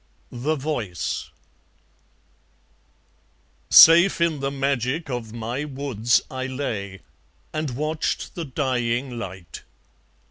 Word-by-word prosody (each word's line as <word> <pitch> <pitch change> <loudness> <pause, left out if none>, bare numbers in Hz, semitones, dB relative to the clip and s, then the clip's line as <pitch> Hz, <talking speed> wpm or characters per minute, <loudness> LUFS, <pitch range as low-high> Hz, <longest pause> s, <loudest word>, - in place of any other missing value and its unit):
The 135 +6 -1
Voice 130 - -3 2.4
Safe 170 +4 +8
in 165 -3 +1
the 135 0 -1
magic 140 +2 -2
of 120 -3 -4
my 120 +4 -4
woods 130 -5 0
I 130 0 -4
lay, 105 -8 -4 0.5
and 155 -5 -3
watched 155 +1 -2
the 170 - -5
dying 125 -2 -2
light. 95 -5 -8
130 Hz, 95 wpm, -23 LUFS, 120-150 Hz, 2.4 s, Safe